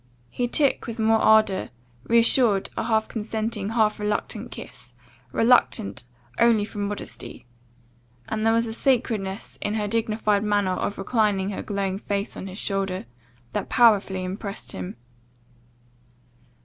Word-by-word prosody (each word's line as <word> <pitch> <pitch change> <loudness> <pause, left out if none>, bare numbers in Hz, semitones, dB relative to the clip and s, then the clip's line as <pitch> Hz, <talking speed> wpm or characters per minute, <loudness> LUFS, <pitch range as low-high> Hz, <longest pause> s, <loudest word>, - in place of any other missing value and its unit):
He 245 - -1
took, 275 +2 +1
with 230 - -5
more 220 0 +3
ardour, 215 -4 +4 0.4
reassured, 230 -3 +3
a - - -2
half 220 -1 +1
consenting, 220 -1 -3
half 220 -2 +1
reluctant 210 +2 -2
kiss, 120 0 -11 0.4
reluctant 130 - +2 0.3
only 230 -3 +4
from 205 -1 -4
modesty; 205 -9 -7 0.8
and 220 0 -2
there 225 - +4
was 230 +1 +2
a 225 - -4
sacredness 225 -6 -1
in 210 - -1
her 210 -1 -1
dignified 215 -1 +1
manner 205 -3 +1
of 205 - -2
reclining 205 -2 +1
her 195 - -4
glowing 195 -2 -2
face 200 0 -2
on 190 - -6
his 190 0 -8
shoulder, 195 - -2 0.5
that - - -3
powerfully 205 -6 +4
impressed 195 +2 -6
him. 90 -1 -6
210 Hz, 135 wpm, -24 LUFS, 195-225 Hz, 0.8 s, ardour